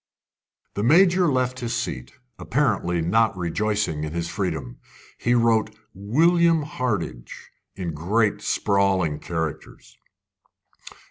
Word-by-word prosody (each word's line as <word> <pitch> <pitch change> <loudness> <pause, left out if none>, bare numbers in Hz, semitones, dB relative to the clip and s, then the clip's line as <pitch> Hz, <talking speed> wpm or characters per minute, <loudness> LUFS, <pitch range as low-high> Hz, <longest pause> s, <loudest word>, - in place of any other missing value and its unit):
The 100 - -3
Major 175 - +4
left 130 -1 -1
his 120 -2 -3
seat, 65 0 -4 0.3
apparently 85 -1 0
not 110 +4 +2
rejoicing 90 -2 -1
in 75 0 -5
his 85 0 -2
freedom. 80 - -4 0.4
He 120 +1 +1
wrote 115 -2 +2 0.2
"William 165 - +2
Hardinge" 100 - -4 0.2
in 90 -4 -4
great 100 +6 0
sprawling 95 -6 +1
characters. 80 -3 -6
100 Hz, 105 wpm, -23 LUFS, 85-120 Hz, 0.4 s, Major